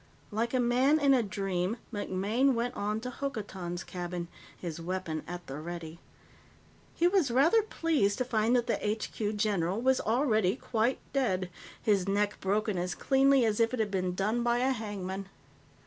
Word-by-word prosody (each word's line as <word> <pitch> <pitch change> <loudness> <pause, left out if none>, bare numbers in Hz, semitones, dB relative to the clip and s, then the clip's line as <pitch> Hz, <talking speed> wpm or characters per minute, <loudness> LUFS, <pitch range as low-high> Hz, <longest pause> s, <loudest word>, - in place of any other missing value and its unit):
Like 230 +4 -1
a - - +3
man 255 +5 +3
in 280 -2 +5
a 255 - +4
dream, 195 -1 -2 0.2
MacMaine 210 +7 +1
went 240 +2 -1
on 210 +2 -1
to 250 +1 -5
Hokotan's 190 -10 -4
cabin, 175 -1 -5 0.3
his 170 -2 -5
weapon 170 -3 -3
at 175 0 -6
the 135 +2 -6
ready. 170 0 -7 1.0
He 345 - +3
was 355 -6 +3
rather 290 - +5
pleased 325 - +1
to 255 - 0
find 230 0 +2
that 240 -1 +2
the 240 - 0
HQ 210 0 -2
general 200 -2 0
was 260 +2 +2
already 220 -5 +2
quite 235 +3 0 0.2
dead, 190 -10 0 0.3
his 200 -3 +2
neck 205 +1 0
broken 205 0 0
as 180 +1 -2
cleanly 270 -2 +4
as 215 -1 +1
if 230 +2 +2
it - - -7
had 215 -2 0
been 185 -2 -1
done 215 +5 0
by 235 0 +2
a 255 +2 +2
hangman. 195 -5 -4
215 Hz, 170 wpm, -30 LUFS, 185-250 Hz, 1.0 s, in